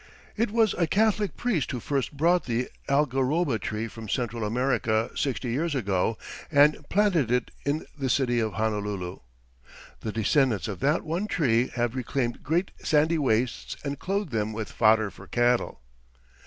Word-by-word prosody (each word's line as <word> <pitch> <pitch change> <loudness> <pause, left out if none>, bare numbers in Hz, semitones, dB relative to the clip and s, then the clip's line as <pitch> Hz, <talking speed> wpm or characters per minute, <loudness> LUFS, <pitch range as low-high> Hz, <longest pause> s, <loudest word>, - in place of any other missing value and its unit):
It 225 +1 +1
was 220 -1 +3
a 170 - +3
Catholic 210 +1 +1
priest 200 - 0
who 125 - -3
first 140 +2 -2
brought 170 +4 +3
the 120 0 -1 0.2
algaroba 140 0 +1
tree 110 +1 -3
from 110 -1 -9
Central 120 -2 -2
America 115 0 0
sixty 125 -3 -1
years 150 +5 -1
ago 100 -2 0 0.3
and 145 0 +5
planted 185 - +2
it 125 0 0 0.2
in 150 +3 0
the 135 -3 -2
city 120 -1 +2
of 110 -3 -1
Honolulu. 105 -4 -2 0.8
The 110 - -4
descendants 115 +1 +2
of 100 -5 -5
that 145 - +1
one 170 +6 -2
tree 125 - +2
have 120 -1 0
reclaimed 125 -1 -2
great 170 +5 0
sandy 160 +2 +2
wastes 125 -3 0
and 140 -1 -4
clothed 195 -3 -2
them 110 -1 -1
with 110 0 -5
fodder 110 -2 +3
for 100 - -14
cattle. 120 - +1
130 Hz, 155 wpm, -27 LUFS, 110-155 Hz, 0.8 s, and